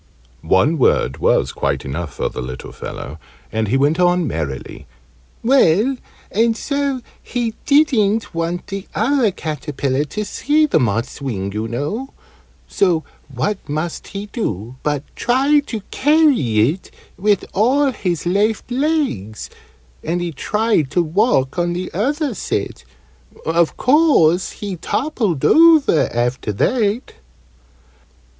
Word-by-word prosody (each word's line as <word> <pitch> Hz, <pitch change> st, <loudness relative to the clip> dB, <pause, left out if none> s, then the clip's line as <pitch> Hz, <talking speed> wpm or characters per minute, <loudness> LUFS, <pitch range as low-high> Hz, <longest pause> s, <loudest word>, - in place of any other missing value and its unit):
One 120 Hz, -, +2 dB
word 65 Hz, -, +2 dB
was -, -, +2 dB
quite -, -, -2 dB
enough 75 Hz, +4 st, -5 dB
for -, -, -1 dB
the -, -, -5 dB
little 65 Hz, 0 st, -7 dB
fellow, 75 Hz, +3 st, -8 dB, 0.3 s
and 110 Hz, -1 st, -1 dB
he 130 Hz, -, +2 dB
went 145 Hz, +5 st, +2 dB
on 175 Hz, -1 st, +3 dB
merrily. 75 Hz, -, -5 dB, 0.6 s
"Well, 240 Hz, -1 st, +4 dB, 0.4 s
and 225 Hz, +2 st, +2 dB
so 280 Hz, -1 st, -1 dB, 0.2 s
he 235 Hz, -3 st, -3 dB
didn't 230 Hz, -8 st, +3 dB
want 170 Hz, +1 st, -2 dB
the 195 Hz, 0 st, -6 dB
other 240 Hz, +1 st, +2 dB
caterpillar 150 Hz, -5 st, -2 dB
to 210 Hz, +8 st, -4 dB
see 300 Hz, +8 st, +2 dB
the 300 Hz, -, +2 dB
moth's 115 Hz, +2 st, -1 dB
wing, 100 Hz, -7 st, -3 dB
oo 110 Hz, +1 st, -2 dB
know 150 Hz, -, -4 dB, 0.5 s
so 175 Hz, -5 st, +1 dB, 0.3 s
what 160 Hz, +11 st, -1 dB
must 155 Hz, +3 st, -3 dB
he 200 Hz, 0 st, -6 dB
do 120 Hz, -, -4 dB
but 145 Hz, -2 st, -1 dB
try 270 Hz, +5 st, +3 dB
to 220 Hz, -3 st, -4 dB
carry 260 Hz, -, +3 dB
it 185 Hz, +4 st, -10 dB, 0.3 s
with 205 Hz, 0 st, +1 dB
all 270 Hz, +7 st, +3 dB
his 180 Hz, -9 st, -3 dB
left 205 Hz, +6 st, 0 dB
legs, 255 Hz, -, -1 dB, 0.5 s
and 175 Hz, +2 st, -1 dB
he 175 Hz, -1 st, -3 dB
tried 210 Hz, -, 0 dB
to 175 Hz, -, +1 dB
walk 165 Hz, -, +1 dB
on 175 Hz, 0 st, 0 dB
the 180 Hz, +1 st, -5 dB
other 280 Hz, -, 0 dB
set. -, -, -3 dB, 0.6 s
Of 165 Hz, 0 st, +1 dB
course 255 Hz, -, +4 dB
he 200 Hz, -3 st, -5 dB
toppled 220 Hz, -, -1 dB
over 320 Hz, -, +5 dB
after 120 Hz, -1 st, -1 dB
that." 220 Hz, -, 0 dB
180 Hz, 130 wpm, -19 LUFS, -, 0.6 s, over